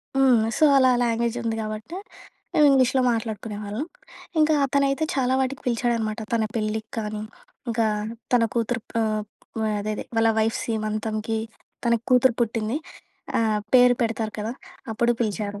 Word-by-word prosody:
హ్మ్. 260 -4 +5 0.2
సో, 310 - +5
అలా 260 -1 +5
ఆ - - 0
లాంగ్వేజుంది 235 -1 -1
గాబట్టి, 215 +8 -5 0.6
మేం 300 - +4
ఇంగ్లీష్‌లో 260 -1 +4
మాట్లాడుకునే 220 -2 -3
వాళ్ళం. 215 +10 -4 0.5
ఇంకా 310 0 +4
అతనైతే 275 +2 +1
చాలా 260 -1 +1
వాటికి 265 +1 -1
పిలిచాడనమాట. 235 -2 0
తన 230 -1 +2
పెళ్ళికి 215 0 -2
కానీ, 210 -1 -3 0.5
ఇంకా 225 -1 +1 0.5
తన 245 -2 +5
కూతురు 235 0 0
ప్ - - -45
ఆహ్, 215 -1 0 0.4
ఆహ్, 215 - 0
అదే 215 +1 -2
అదే - - -5
వాళ్ళ 225 0 +4
వైఫ్ 220 +1 +1
సీమంతంకి, 215 0 -2 0.5
తనకి 235 -1 +1
కూతురు 250 -1 +5
పుట్టింది. 225 +1 0 0.6
ఆ! - - +2 0.3
పేరు 250 0 +7
పెడతారు 225 -1 -1
కదా! 215 +2 -3 0.4
అప్పుడూ 235 +2 +2
పిలిచారు. 205 -2 -2
230 Hz, 145 wpm, -24 LUFS, 215-250 Hz, 0.6 s, పేరు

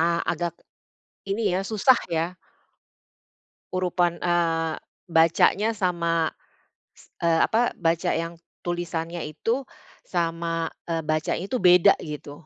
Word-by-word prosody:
a 170 +1 +2
agak 170 0 -2 0.8
ini 215 +1 +1
ya - - 0
susah 225 +4 +4
ya. 170 +2 -1 1.4
Urutan, 175 -1 0
eee, 165 -2 +1 0.3
bacanya 165 +6 +4
sama 170 -4 0 0.7
s - - -20
eee, 165 -1 +3
apa 235 +2 +1
baca 165 -1 +1
yang 165 +1 -2 0.3
tulisannya 170 -1 -3
itu, 225 - -2 0.4
sama, 165 -1 -1 0.2
eee, 165 -1 0
bacanya 155 +2 -1
itu 255 - 0
beda 180 -3 +6
gitu. 150 0 -8
170 Hz, 110 wpm, -25 LUFS, 165-180 Hz, 1.4 s, beda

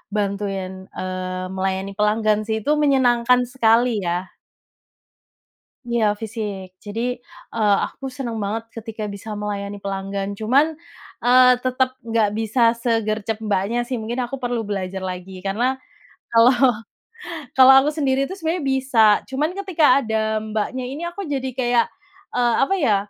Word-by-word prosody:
bantuin, 200 -2 -2 0.3
eee, 185 0 -4
melayani 190 +1 -2
pelanggan 210 0 +2
sih, 220 - 0
itu 290 - 0
menyenangkan 250 -3 +4
sekali 235 -1 +3 0.2
ya. 175 +2 -2 1.6
Iya 230 -3 +1
fisik. 205 -4 -6
Jadi, 230 +5 -3 0.3
eee, 210 -3 +2
aku 270 - -9
senang 255 -3 -5
banget 220 +2 -3
ketika 220 -2 -6
bisa 205 +2 -7
melayani 205 -1 -5
pelanggan. 195 0 -3
Cuman, 280 +8 +2 0.4
eee, 250 +1 +6
tetap 255 +1 -1
enggak 225 -2 +2
bisa 230 +1 +3
segercep 225 -2 -1
Mbaknya, 210 +3 0
sih. 245 0 -3
Mungkin 235 +3 -3
aku 250 +3 -4
perlu 245 -2 -2
belajar 195 -2 -4
lagi. 185 0 -6
Karena 225 +7 0 0.6
kalau 235 +3 +6 1.0
kalau 265 0 +9
aku 295 - +1
sendiri 275 -3 +1
itu 380 - -6
sebenarnya 325 0 -1
bisa, 265 -3 0 0.3
cuman 295 +5 -1
ketika 320 -9 +4
ada 220 -2 -1
Mbaknya 220 +4 -3
ini 280 +6 -6
aku 345 +2 -5
jadi 270 -2 -2
kayak, 240 -1 +3 0.5
eee, 240 -1 +2
apa 385 +8 +1
ya, 235 - +3
225 Hz, 135 wpm, -21 LUFS, 205-255 Hz, 1.6 s, kalau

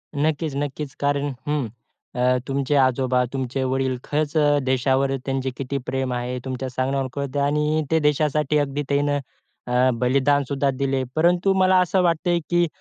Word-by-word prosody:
नक्कीच, 150 0 0
नक्कीच. 145 -1 -4
कारण 145 0 0 0.2
हं. 145 -5 0 0.5
अ, 125 +1 +2
तुमचे 140 +1 0
आजोबा, 130 -1 +2
तुमचे 130 0 -2
वडील 130 0 0
खरंच 150 +1 -2
अ, 145 -1 +4
देशावर 135 +1 +1
त्यांचं 135 -1 -1
किती 140 +1 -3
प्रेम 130 -1 -2
आहे 125 +1 -3
तुमच्या 130 0 -4
सांगण्यावर 130 +1 -1
कळतं 140 0 -3
आणि 150 +2 +1
ते 160 - +4
देशासाठी 150 0 +1
अगदी 145 0 -1
त्यांनी 145 0 +1 0.5
अ, 125 +1 +3
बलिदान 140 +3 +2
सुद्धा 140 0 0
दिलं. 135 0 -1
परंतु 175 +4 +3
मला 185 0 +5
असं 180 +1 +2
वाटतं 170 +1 +1
आहे, 175 0 +3
की 175 -1 +3
140 Hz, 160 wpm, -23 LUFS, 130-150 Hz, 0.5 s, मला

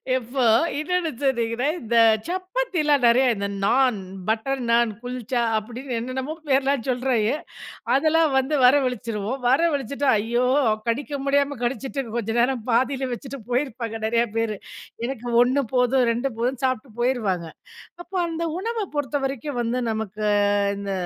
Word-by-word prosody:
இப்போ, 255 +1 -2 0.3
இன்னொண்ணு 335 +2 0
சொன்னீங்கன்னா, 240 -2 0
இந்த 235 0 -2 0.3
சப்பாத்தில 370 -4 0
நிறையா, 250 +3 +5
இந்த 200 0 -2 0.2
நான், 250 +2 +3 0.3
பட்டர் 240 +5 -1
நான், 235 -1 +3
குல்ச்சா 245 0 -3 0.2
அப்டின்னு 245 +4 -5
என்னென்னமோ 260 +5 -4
பேர்லாம் 275 -2 +2
சொல்றாங்க. 250 -4 +1 0.6
அதெல்லாம் 315 +2 +3
வந்து 265 +3 +1
வரவழிச்சிருவோம். 250 -3 +1
வரவழிச்சிட்டு, 280 -1 +1
ஐயோ! 235 +4 0 0.4
கடிக்க 285 +5 -1
முடியாம 280 0 +1
கடிச்சிட்டு, 270 +3 -2 0.2
கொஞ்சம் 225 +1 -1
நேரம் 250 0 +1
பாதியில 260 +3 +1
வச்சுட்டு 275 +3 -7
போயிருப்பாங்க, 240 -4 -2
நிறையா 230 +1 +2
பேரு. 225 -2 -1 0.5
எனக்கு 245 -1 -5 0.2
1 260 +3 +1
போதும், 250 +1 +3
2 245 +4 -1
போதுன்னு 255 +2 -1
சாப்பிட்டு 255 -1 -2
போயிருவாங்க. 215 -9 0 0.6
அப்போ, 355 +3 -11
அந்த 335 0 -3 0.2
உணவ 450 +1 -2
பொறுத்தவரைக்கும் 275 -1 -2
வந்து, 240 +2 -1
நமக்கு 215 -1 -4 0.5
இந்த 200 0 -4
255 Hz, 125 wpm, -23 LUFS, 235-280 Hz, 0.6 s, நிறையா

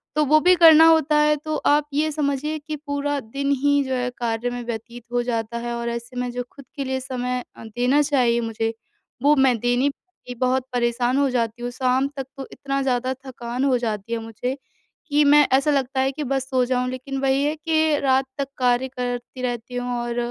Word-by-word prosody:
तो 305 - +3
वो 310 +2 +5
भी 365 +1 +6
करना 325 -1 +8
होता 315 -2 +4
है 300 0 +4
तो 310 0 -1
आप 295 0 +3
ये 310 +2 +1
समझिए 295 +1 -1
कि 305 +1 -6
पूरा 285 0 -1
दिन 275 +4 -4
ही 285 0 +3
जो 260 0 -3
है 250 0 -1
कार्य 235 0 -1
में 245 0 -5
व्यतीत 235 +1 -6
हो 245 - +2
जाता 235 -1 -2
है 240 0 -4
और 235 0 -3
ऐसे 235 +1 -6
में 250 - -2
जो 245 0 -3
ख़ुद 280 -2 -13
के 280 - -3
लिए 260 0 -2
समय 250 -1 -3
अ, - - -11
देना 245 +6 +1
चाहिए 250 -5 +2
मुझे 225 0 -2 0.5
वो 295 +1 +5
मैं 265 -3 +3
दे 245 +1 +1
नहीं 275 +3 +2
पाती 275 -6 -13
बहुत 255 +1 0
परेशान 240 +1 +1
हो 280 -1 +3
जाती 235 -1 -2
हूँ 245 - -2
शाम 255 +2 +1
तक 270 - -3
तो 270 - -6
इतना 275 -1 -3
ज़्यादा 255 0 0
थकान 245 0 -4
हो 260 -2 +3
जाती 220 -1 -3
है 230 - -1
मुझे 225 +4 -4 0.5
कि 295 +1 +4
मैं 295 0 +6
ऐसा 295 +2 +1
लगता 265 -1 0
है 265 +1 +1
कि 300 +2 -5
बस 270 0 -2
सो 255 -1 +2
जाऊँ 250 0 0
लेक़िन 260 +1 -5
वही 270 +1 +2
है 300 +2 0
कि 315 -1 +1
रात 265 0 +3
तक 275 - -1
कार्य 250 0 +2
करती 250 0 -5
रहती 245 0 -4
हूँ 245 0 -2
और 240 0 -4
260 Hz, 220 wpm, -23 LUFS, 245-285 Hz, 0.5 s, करना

